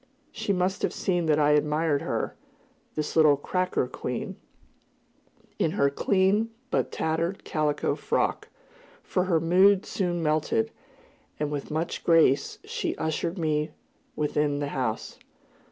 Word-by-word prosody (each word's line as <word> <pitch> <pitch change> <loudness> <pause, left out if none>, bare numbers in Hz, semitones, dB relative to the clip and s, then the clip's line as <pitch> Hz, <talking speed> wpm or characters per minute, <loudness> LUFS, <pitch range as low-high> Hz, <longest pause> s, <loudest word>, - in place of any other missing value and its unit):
She - - -2
must 185 0 0
have - - 0
seen 175 -3 0
that 150 -1 +4
I 150 -1 +4
admired 150 0 +2
her, - - -2 0.6
this 155 -1 -3
little 155 -3 +6
"cracker" 180 +1 0
queen, 125 -1 -4 1.2
in 160 - +1
her 140 -8 +2
clean 195 +7 +2 0.2
but - - 0
tattered 165 +4 -1
calico 150 -3 0
frock; - - -1 0.5
for 180 - 0
her 170 -3 +2
mood 185 +4 +4
soon 175 -3 -1
melted, 155 +9 +1 0.7
and 150 -1 -1
with 145 -2 -4
much 160 +2 -3
grace 165 -5 +4
she - - -3
ushered 165 +3 -2
me 155 -2 0 0.5
within 150 -1 0
the 145 0 -2
house. 125 -6 -3
160 Hz, 130 wpm, -27 LUFS, 150-180 Hz, 1.2 s, little